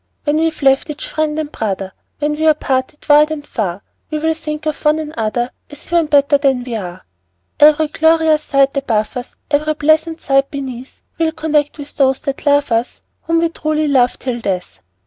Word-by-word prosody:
When 295 Hz, 0 st, +1 dB
we've 320 Hz, -2 st, -1 dB
left 270 Hz, +3 st, +3 dB
each 300 Hz, -, -5 dB
friend 310 Hz, -1 st, -1 dB
and 305 Hz, -1 st, -3 dB
brother, 195 Hz, -5 st, -3 dB, 0.3 s
When 295 Hz, 0 st, -1 dB
we're 310 Hz, 0 st, +3 dB
parted 265 Hz, +1 st, -2 dB
wide 300 Hz, +1 st, +6 dB
and 305 Hz, -2 st, -5 dB
far, 200 Hz, -7 st, -3 dB, 0.3 s
We 310 Hz, -, -2 dB
will 320 Hz, +1 st, +1 dB
think 305 Hz, -1 st, -5 dB
of 310 Hz, -2 st, -3 dB
one 300 Hz, +1 st, +3 dB
another, 240 Hz, -5 st, -2 dB, 0.2 s
As 290 Hz, 0 st, -12 dB
even 340 Hz, -2 st, +1 dB
better 285 Hz, -1 st, +4 dB
than 270 Hz, -3 st, +1 dB
we 245 Hz, -2 st, -5 dB
are. 180 Hz, -4 st, -7 dB, 0.5 s
Every 305 Hz, +1 st, +6 dB
glorious 320 Hz, 0 st, +3 dB
sight 275 Hz, -2 st, +2 dB
above 225 Hz, -6 st, -1 dB
us, 250 Hz, 0 st, -6 dB, 0.2 s
Every 305 Hz, +1 st, +1 dB
pleasant 315 Hz, +2 st, +1 dB
sight 275 Hz, 0 st, +1 dB
beneath, 260 Hz, -2 st, -7 dB, 0.2 s
We'll 320 Hz, -1 st, +1 dB
connect 305 Hz, -2 st, 0 dB
with 290 Hz, -1 st, -9 dB
those 270 Hz, -2 st, +3 dB
that 275 Hz, +1 st, -4 dB
love 285 Hz, -2 st, +3 dB
us, 230 Hz, +2 st, -1 dB, 0.2 s
Whom 330 Hz, 0 st, +2 dB
we 335 Hz, -, +2 dB
truly 310 Hz, -1 st, -1 dB
love 255 Hz, -3 st, +2 dB
till 250 Hz, -2 st, -4 dB
death! 185 Hz, -4 st, -3 dB
290 Hz, 185 wpm, -17 LUFS, 260-310 Hz, 0.5 s, wide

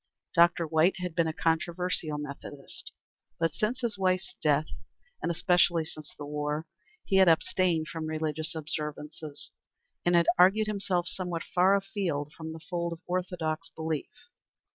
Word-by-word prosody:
Dr. 170 Hz, 0 st, +5 dB
White 160 Hz, +3 st, +3 dB
had 180 Hz, -2 st, -4 dB
been 170 Hz, 0 st, +2 dB
a -, -, 0 dB
controversial 165 Hz, -1 st, 0 dB
Methodist, 145 Hz, -1 st, -8 dB, 0.5 s
but 165 Hz, -2 st, +1 dB
since 240 Hz, +5 st, -1 dB
his 225 Hz, -5 st, -2 dB
wife's 185 Hz, -1 st, +1 dB
death, 150 Hz, 0 st, +3 dB, 0.6 s
and -, -, -1 dB
especially 175 Hz, -1 st, +3 dB
since 155 Hz, -2 st, -8 dB
the 145 Hz, -, -6 dB
war, 150 Hz, +1 st, -2 dB, 0.4 s
he 195 Hz, -, +2 dB
had 190 Hz, -1 st, +7 dB
abstained 165 Hz, 0 st, +2 dB
from 160 Hz, -1 st, -4 dB
religious 155 Hz, +1 st, -2 dB
observances, 150 Hz, -1 st, -5 dB, 0.5 s
and 175 Hz, 0 st, +3 dB
had 170 Hz, 0 st, +5 dB
argued 195 Hz, +4 st, +6 dB
himself 195 Hz, -4 st, -1 dB
somewhat 180 Hz, -3 st, -2 dB
far 185 Hz, +2 st, +4 dB
afield 190 Hz, -7 st, -2 dB
from 160 Hz, -1 st, -7 dB
the 160 Hz, -, -7 dB
fold 170 Hz, +1 st, -3 dB
of 165 Hz, -, -11 dB
orthodox 175 Hz, -3 st, -2 dB
belief. 160 Hz, -2 st, -3 dB
165 Hz, 145 wpm, -29 LUFS, 155-180 Hz, 0.6 s, had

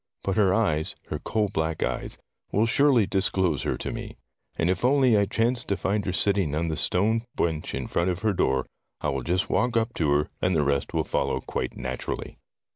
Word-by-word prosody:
But 95 Hz, -, -1 dB
her 100 Hz, -4 st, +4 dB
eyes, 85 Hz, -8 st, +1 dB
her -, -, -3 dB
coal 105 Hz, -2 st, 0 dB
black 80 Hz, 0 st, -1 dB
eyes, -, -, -1 dB, 0.3 s
will 105 Hz, +3 st, +3 dB
surely 125 Hz, -1 st, +4 dB
disclose 95 Hz, -6 st, +1 dB
her -, -, -1 dB
to -, -, -4 dB
me. -, -, -7 dB, 0.4 s
And 85 Hz, -, 0 dB
if 95 Hz, +3 st, 0 dB
only 130 Hz, -2 st, +4 dB
I 100 Hz, -1 st, +4 dB
chance 115 Hz, +4 st, +1 dB
to 100 Hz, -, -1 dB
find 100 Hz, +3 st, -1 dB
her -, -, +1 dB
sitting 95 Hz, -5 st, +1 dB
on 85 Hz, +2 st, 0 dB
the 80 Hz, -, -1 dB
stone 105 Hz, +8 st, +2 dB, 0.2 s
bench 80 Hz, -2 st, -1 dB
in -, -, -3 dB
front 85 Hz, +2 st, 0 dB
of 90 Hz, +1 st, -2 dB
her 110 Hz, -2 st, +2 dB
door, 65 Hz, -7 st, +1 dB, 0.3 s
I 75 Hz, -, -1 dB
will 70 Hz, -1 st, -1 dB
just 90 Hz, +8 st, 0 dB
walk 120 Hz, -1 st, +2 dB
up 115 Hz, +1 st, 0 dB
to 80 Hz, -3 st, 0 dB
her, 75 Hz, +1 st, +1 dB
and 90 Hz, -1 st, +2 dB
the 75 Hz, -, +3 dB
rest 70 Hz, -1 st, -1 dB
will -, -, +2 dB
follow -, -, -1 dB
quite -, -, -4 dB
naturally." -, -, -5 dB
95 Hz, 210 wpm, -26 LUFS, 80-110 Hz, 0.4 s, her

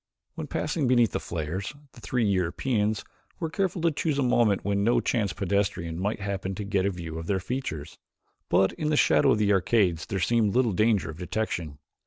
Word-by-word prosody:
When -, -, -6 dB
passing 150 Hz, -2 st, -1 dB
beneath 120 Hz, -5 st, +4 dB
the -, -, -2 dB
flares 85 Hz, -, -4 dB, 0.2 s
the 120 Hz, -, -15 dB
three 120 Hz, -1 st, 0 dB
Europeans 105 Hz, +3 st, 0 dB, 0.4 s
were 165 Hz, -2 st, -3 dB
careful 180 Hz, 0 st, -1 dB
to 170 Hz, -, +4 dB
choose 150 Hz, 0 st, -1 dB
a 140 Hz, -, +2 dB
moment 120 Hz, -5 st, +2 dB
when 100 Hz, 0 st, +1 dB
no 120 Hz, +3 st, +3 dB
chance 105 Hz, -6 st, 0 dB
pedestrian 95 Hz, -2 st, -1 dB
might 105 Hz, +2 st, -2 dB
happen 95 Hz, -1 st, -3 dB
to 105 Hz, -, -4 dB
get 100 Hz, -1 st, 0 dB
a -, -, +2 dB
view 85 Hz, -4 st, -6 dB
of 80 Hz, -, -7 dB
their 95 Hz, -2 st, +1 dB
features, 85 Hz, -, -5 dB, 0.5 s
but 95 Hz, 0 st, +3 dB
in 150 Hz, -, -2 dB
the 150 Hz, -, +2 dB
shadow 75 Hz, -, +4 dB
of -, -, +4 dB
the 105 Hz, -1 st, +3 dB
arcades 95 Hz, -4 st, +2 dB
there 100 Hz, -, -2 dB
seemed 110 Hz, +2 st, +2 dB
little 125 Hz, -4 st, +3 dB
danger 105 Hz, -3 st, +2 dB
of 80 Hz, -, -12 dB
detection. 90 Hz, -6 st, -3 dB
100 Hz, 200 wpm, -27 LUFS, 90-120 Hz, 0.5 s, beneath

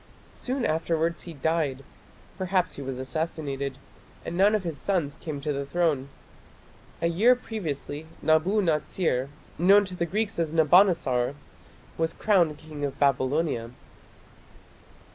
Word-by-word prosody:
Soon 255 Hz, -1 st, -2 dB
afterwards 165 Hz, +1 st, 0 dB
he -, -, -6 dB
died 145 Hz, -2 st, -1 dB, 0.5 s
perhaps 185 Hz, 0 st, 0 dB
he -, -, -7 dB
was 135 Hz, -2 st, -4 dB
assassinated 140 Hz, -1 st, -3 dB, 0.5 s
and -, -, -4 dB
none 200 Hz, +4 st, +4 dB
of 210 Hz, -, -1 dB
his 165 Hz, -5 st, -4 dB
sons 170 Hz, -8 st, -1 dB
came 155 Hz, -3 st, -6 dB
to 150 Hz, +1 st, -1 dB
the 140 Hz, 0 st, -2 dB
throne. 145 Hz, -2 st, 0 dB, 0.9 s
A -, -, +4 dB
year 210 Hz, +10 st, +4 dB
previously 160 Hz, -, -5 dB
Nabu 175 Hz, +7 st, +3 dB
natsir, 155 Hz, -4 st, 0 dB, 0.3 s
known 200 Hz, +4 st, +6 dB
to 185 Hz, -1 st, -7 dB
the 170 Hz, -1 st, -1 dB
Greeks 210 Hz, +1 st, -1 dB
as 165 Hz, -2 st, 0 dB
Nabonassar, 160 Hz, -6 st, +4 dB, 0.6 s
was 165 Hz, 0 st, +1 dB
crowned 175 Hz, -8 st, +2 dB
king 155 Hz, -2 st, -8 dB
of 140 Hz, -1 st, -2 dB
Babylonia. 135 Hz, -2 st, +1 dB
160 Hz, 130 wpm, -26 LUFS, 140-180 Hz, 0.9 s, known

